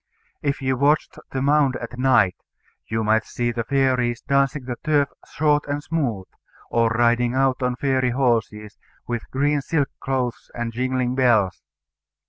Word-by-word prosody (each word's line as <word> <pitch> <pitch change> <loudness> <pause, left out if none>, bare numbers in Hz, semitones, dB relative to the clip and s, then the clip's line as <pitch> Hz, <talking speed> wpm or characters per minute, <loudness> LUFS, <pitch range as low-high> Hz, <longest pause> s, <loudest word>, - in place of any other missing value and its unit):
If 140 -1 -2
you 130 -1 0
watched 145 +3 +1
the 130 0 -2
mound 140 -2 +3
at 120 +1 -6
night, 125 -8 +3 0.5
you 110 0 -1
might 110 +1 +2
see 120 +1 -2
the 115 0 -3
fairies 125 -2 +1
dancing 140 0 +1
the 125 -1 -4
turf 145 -3 +2 0.2
short 150 -1 +1
and 145 +1 -3
smooth, 125 - -2 0.5
or 115 -1 +3
riding 120 +1 +2
out 135 0 +1
on 125 -1 0
fairy 130 -1 +1
horses, 115 -5 -1 0.3
with 120 -1 -4
green 145 +2 +1
silk 145 -1 0
clothes 130 -3 -3
and 120 -1 -3
jingling 125 +1 -1
bells. 120 -8 +2
130 Hz, 150 wpm, -22 LUFS, 120-140 Hz, 0.5 s, mound